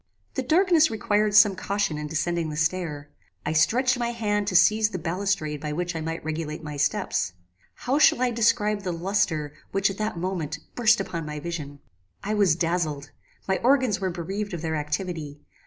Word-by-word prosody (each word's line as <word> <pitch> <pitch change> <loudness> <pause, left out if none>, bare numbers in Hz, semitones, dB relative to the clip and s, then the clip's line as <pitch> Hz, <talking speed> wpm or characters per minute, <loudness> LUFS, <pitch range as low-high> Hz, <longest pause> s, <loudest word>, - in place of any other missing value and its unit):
"The 265 - -1
darkness 325 +3 +4
required 210 -1 +1
some 210 -2 +7
caution 195 -5 -1
in 150 - -4
descending 160 +1 -1
the 150 - -5
stair. 160 -3 -2 0.3
I - - 0
stretched 245 +11 +3
my 235 -1 0
hand 210 -3 -1
to 185 - -1
seize 215 +3 +5
the 190 - -4
balustrade 165 -3 -2
by 150 -1 -3
which 175 +2 -3
I 160 - -3
might 165 +1 -4
regulate 155 0 -4
my 150 -1 -6
steps. 140 -9 0 0.4
How 265 +4 0
shall 275 - +5
I 250 -1 +2
describe 215 -2 +2
the 185 -3 -3
lustre, 165 -4 -1 0.2
which, 195 0 +1
at 195 - -9
that 215 -4 -2
moment, 165 -4 -3 0.2
burst 230 -2 +4
upon 170 -5 -4
my 150 0 -5
vision! 145 -3 -6 0.4
"I 210 - -1
was 200 -7 +3
dazzled. 165 -4 -1 0.4
My 190 -1 +1
organs 255 -6 +2
were 190 - 0
bereaved 190 +3 -4
of 165 - -7
their 160 -1 -1
activity. 150 -1 -4
180 Hz, 185 wpm, -25 LUFS, 155-210 Hz, 0.4 s, some